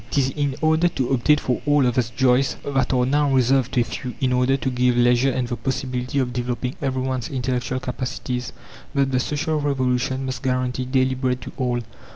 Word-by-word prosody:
It - - -1
is 135 -1 +3
in 145 -2 -1
order 160 +2 +3
to 135 -7 -2
obtain 135 +3 +3
for 125 -4 -2
all 145 -2 +4
of 125 -1 +1
us 125 -3 +1
joys 130 +2 +2
that 135 -2 0
are 125 -1 +2
now 145 +2 +2
reserved 130 -1 +2
to 125 - +3
a - - +3
few; 125 +2 -6
in 130 -1 +1
order 125 +2 +2
to 130 - -2
give 125 0 +2
leisure 120 +2 +4
and 130 -2 -1
the 120 - -2
possibility 125 +2 -3
of 125 -2 0
developing 125 +1 -2
everyone's 130 -2 -2
intellectual 130 -1 -2
capacities, 125 0 -4 0.4
that 135 -1 +2
the 130 - +2
social 150 +3 -1
revolution 130 -1 0
must 130 -2 -4
guarantee 125 0 -1
daily 130 0 +2
bread 130 -1 -1
to - - -8
all. 125 -2 -1
130 Hz, 200 wpm, -22 LUFS, 125-135 Hz, 0.4 s, all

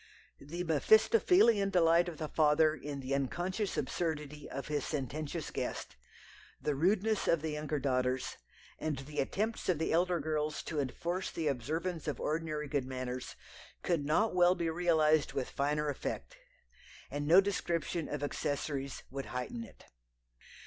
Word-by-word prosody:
The 170 +5 -5
mephistophelian 220 - +5
delight 170 -1 +4
of 165 - -8
the 155 - -3
father 155 0 +4
in 145 -2 -6
the 130 +1 -3
unconscious 175 - -1
absurdity 150 -3 -3
of 135 - -5
his 150 -2 -1
sententious 145 +1 -3
guest, - - -4 0.6
the 150 - 0
rudeness 195 +8 +2
of 165 -2 +3
the 160 - -1
younger 150 0 -2
daughters, 130 -2 0 0.4
and 155 -3 -2
the 140 +3 -6
attempts 215 +11 -1
of 180 - +3
the 160 - 0
elder 175 +1 +2
girls 155 0 -1
to 155 - -3
enforce 170 +7 -2
the 160 -2 -2
observance 160 +6 -2
of 145 -5 -2
ordinary 155 -1 -2
good 140 -2 -1
manners, 130 -1 -4 0.5
could 170 -5 +1
not 165 +10 +2
well 180 0 +5
be 170 -2 -1
realized 160 -3 +3
with 130 -2 -2
finer 150 +2 0
effect, 145 - -4 0.8
and 145 0 -3
no 170 +4 +8
description 175 -4 -1
of 145 -1 -3
accessories 140 -1 -2
would 135 0 -5
heighten 230 - -4
it. - - -15
155 Hz, 150 wpm, -33 LUFS, 145-175 Hz, 0.8 s, no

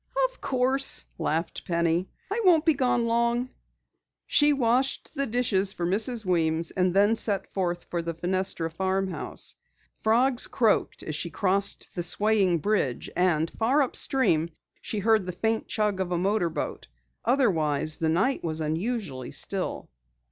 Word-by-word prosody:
"Of - - -22
course," 265 +1 +1
laughed 165 +1 -2
Penny. 170 +1 0 0.2
"I 450 +3 0
won't 335 -5 +5
be 320 - +5
gone 250 -4 +1
long." 235 +2 0 0.7
She 295 0 +4
washed 260 0 0
the 275 -2 -2
dishes 215 -5 +1
for 175 - -3
Mrs. 215 +5 +1
Weems 165 -2 +1
and 185 -1 +1
then 205 +4 +3
set 200 -3 +1
forth 175 -2 -2
for 170 - -1
the 165 0 -4
Fenestra 175 -1 -1
farmhouse. 190 +2 -2 0.4
Frogs 245 +3 +2
croaked 225 -3 +1
as 155 - -5
she 165 +3 -3
crossed 195 +4 +1
the 175 - -3
swaying 200 -1 +2
bridge, 150 - -1
and 165 -3 +1
far 260 +6 +2
upstream 240 - +1 0.3
she 215 - -4
heard 215 -2 +2
the - - -2
faint 220 +5 -1
chug 210 -3 -1
of 185 -1 -2
a 175 - +1
motorboat. 180 -2 -1 0.4
Otherwise, 160 - +1
the 160 - +1
night 195 +12 +1
was 160 -1 -1
unusually 160 - -3
still. - - -3
195 Hz, 145 wpm, -26 LUFS, 170-235 Hz, 0.7 s, won't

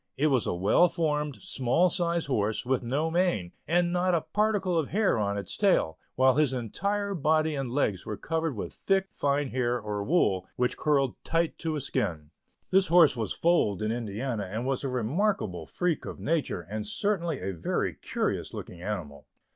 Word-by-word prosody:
It 150 +3 +3
was 130 -5 +2
a - - 0
well 100 - +4
formed, 150 -4 -1
small 150 0 +2
sized 170 -2 0
horse, 110 -5 -1
with 130 0 +1
no 140 +7 -1
mane, 170 - +1 0.2
and 175 +2 +2
not 180 0 +2
a 165 - +1
particle 205 -3 0
of 160 -4 +1
hair 200 - +1
on 100 -1 0
his 100 -3 -5
tail, 80 - +2 0.2
while 130 0 +5
his 150 -4 +3
entire 200 - -2
body 155 -1 +2
and 135 -3 -3
legs 105 -9 0
were 105 - -5
covered 165 -3 -2
with 105 - -5
thick, 195 0 0
fine 140 -1 0
hair 125 -1 0
or 105 -1 -3
wool, 100 - +2
which 125 0 0
curled 140 -4 0
tight 165 0 0
to 160 -2 -2
his 145 -2 -3
skin. 80 - -2 0.4
This 190 0 +4
horse 165 -4 +6
was 110 -5 -2
foaled 135 - +2
in 110 - 0
Indiana, 110 -2 -3
and 115 +4 -3
was 135 0 -1
a 135 - -1
remarkable 125 - -1
freak 180 -3 -1
of - - -7
nature, 155 - -1
and 105 +4 -5
certainly 170 - -1
a 95 +1 -3
very 85 - -1
curious - - -3
looking 85 - -8
animal. 85 -8 -5
135 Hz, 185 wpm, -28 LUFS, 110-170 Hz, 0.4 s, horse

